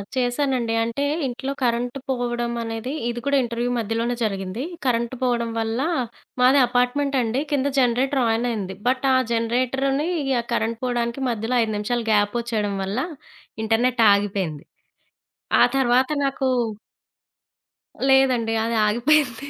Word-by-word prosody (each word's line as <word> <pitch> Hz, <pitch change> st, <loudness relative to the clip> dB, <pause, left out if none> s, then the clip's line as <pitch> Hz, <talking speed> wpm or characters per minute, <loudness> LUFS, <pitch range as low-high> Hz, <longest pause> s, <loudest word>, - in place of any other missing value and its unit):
చేశానండి 250 Hz, -2 st, 0 dB
అంటే, 230 Hz, +5 st, -2 dB, 0.2 s
ఇంట్లో 260 Hz, +2 st, -4 dB
కరెంటు 245 Hz, +2 st, 0 dB
పోవడం 240 Hz, -2 st, -1 dB
అనేది 225 Hz, +2 st, -4 dB, 0.2 s
ఇది 240 Hz, 0 st, -3 dB
కూడా 280 Hz, 0 st, +3 dB
ఇంటర్‌వ్యూ 240 Hz, +1 st, -2 dB
మధ్యలోనే 230 Hz, +2 st, -1 dB
జరిగింది. 195 Hz, +2 st, -3 dB, 0.2 s
కరెంటు 235 Hz, 0 st, 0 dB
పోవడం 240 Hz, -2 st, 0 dB
వల్ల, 225 Hz, +2 st, -1 dB, 0.6 s
మాది 260 Hz, +3 st, +6 dB
అపార్ట్మెంట్ 250 Hz, +3 st, +1 dB
అండి, 240 Hz, +3 st, -1 dB
కింద 280 Hz, -1 st, +1 dB
జనరేటర్ 255 Hz, +2 st, +2 dB
అనయింది 220 Hz, -6 st, -3 dB
బట్ 255 Hz, +1 st, +1 dB
ఆ! -, -, +4 dB, 0.2 s
జనరేటర్‌‌ని 255 Hz, +6 st, 0 dB, 0.3 s
ఆ! -, -, -15 dB
కరెంట్ 230 Hz, 0 st, -1 dB
పోవడానికి 240 Hz, 0 st, -1 dB
మధ్యలో 230 Hz, +1 st, -2 dB
5 220 Hz, -1 st, -1 dB
నిమిషాలు 235 Hz, +3 st, -2 dB
గ్యాప్ 205 Hz, +1 st, +2 dB
ఒచ్చేయడం 215 Hz, -4 st, -2 dB
వల్ల 195 Hz, +5 st, -2 dB, 0.6 s
ఇంటర్నెట్ 235 Hz, +2 st, +2 dB
ఆగిపేంది 195 Hz, -7 st, -2 dB, 1.0 s
ఆ -, -, +8 dB
తర్వాత 255 Hz, 0 st, +3 dB, 0.2 s
నాకు 270 Hz, -1 st, -1 dB, 1.6 s
లేదండి. 255 Hz, -4 st, +3 dB
అది 230 Hz, 0 st, -1 dB
ఆగిపోయింది. 260 Hz, +3 st, +1 dB
240 Hz, 125 wpm, -23 LUFS, 225-260 Hz, 1.6 s, ఆ